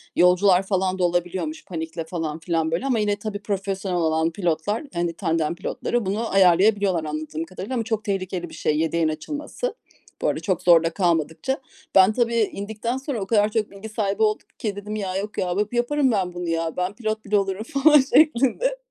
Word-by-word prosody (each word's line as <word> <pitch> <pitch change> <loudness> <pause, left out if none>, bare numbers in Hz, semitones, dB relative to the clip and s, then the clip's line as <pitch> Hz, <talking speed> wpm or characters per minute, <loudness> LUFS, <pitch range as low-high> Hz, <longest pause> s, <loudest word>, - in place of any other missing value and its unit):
yolcular 180 +1 +5
falan 190 -1 0
da - - +1
olabiliyormuş 175 - -1
panikle 165 -1 -5
falan 160 -2 -4
filan 165 -1 -1
böyle 170 +11 -1
ama 250 -5 +1
yine 205 -1 +1
tabii 205 0 -5
profesyonel 195 -2 -2
olan 160 0 +1
pilotlar, 175 - -1
yani 170 -1 -1
tandem 165 -2 -1
pilotları 240 +4 -2
bunu 215 +4 -2
ayarlayabiliyorlar 190 -1 +4
anladığım 155 +1 -4
kadarıyla 185 +8 -7
ama 230 - 0
çok 220 -2 -2
tehlikeli 185 -4 -3
bir - - -14
şey 150 - 0
yedeğin 165 0 +1
açılması. 295 - -4 0.5
Bu - - +1
arada - - 0
çok 185 -3 -1
zorda 170 -2 +5
kalmadıkça. 170 - 0 0.4
Ben 190 +3 +7
tabii, 235 -1 +1
indikten 220 +2 -1
sonra 265 -4 -4
o - - -2
kadar 210 -2 +3
çok 215 -2 -1
bilgi 200 +2 -9
sahibi 210 -1 -2
oldum 215 0 0
ki 210 -3 -3
dedim 210 +1 -6
"Ya, 190 -3 -3
yok 210 +2 -5
ya, 180 -1 0 0.2
yaparım 260 +2 +1
ben 185 -4 0
bunu 175 -1 -4
ya, 165 0 -2
ben 180 +2 -1
pilot 220 -2 -3
bile 205 0 +2
olurum." 195 +1 -1
falan 285 +4 +5
şeklinde, 310 - +3
195 Hz, 185 wpm, -23 LUFS, 170-220 Hz, 0.5 s, Ben